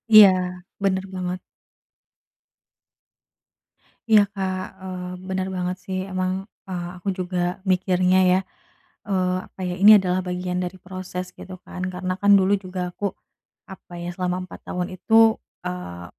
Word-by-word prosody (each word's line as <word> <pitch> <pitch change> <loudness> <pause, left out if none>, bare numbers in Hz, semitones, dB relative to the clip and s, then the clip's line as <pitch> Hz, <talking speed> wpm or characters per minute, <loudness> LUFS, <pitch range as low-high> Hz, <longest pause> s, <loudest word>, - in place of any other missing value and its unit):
Iya 210 -2 +12 0.5
bener 190 -1 +2
banget. 180 0 -3 2.7
Iya 220 -2 +7
Kak, 190 -2 -2 0.2
eee, 180 -1 -5 0.2
bener 190 0 -1
banget 180 0 -1
sih 190 0 -3
emang, 185 0 -2 0.2
eee, 175 -2 -3
aku 180 +2 -3
juga 180 -1 -2
mikirnya 185 0 +3
ya, 185 - +4 0.7
eee, 185 -2 +1
apa - - -12
ya 180 - -2
ini 210 +2 +10
adalah 185 -1 0
bagian 180 0 -2
dari 180 +1 -5
proses 180 -1 -6
gitu 185 - -9
kan 180 - -7
karena 185 0 -2
kan 205 0 +5
dulu 190 +1 +3
juga 185 -2 -4
aku 200 +1 -2 0.6
apa 190 -2 -12
ya, 175 - -4
selama 180 0 -1
4 - - -11
tahun 180 -1 -2
itu, 225 +3 +5 0.3
eee, 135 - -5
185 Hz, 135 wpm, -23 LUFS, 180-190 Hz, 2.7 s, Iya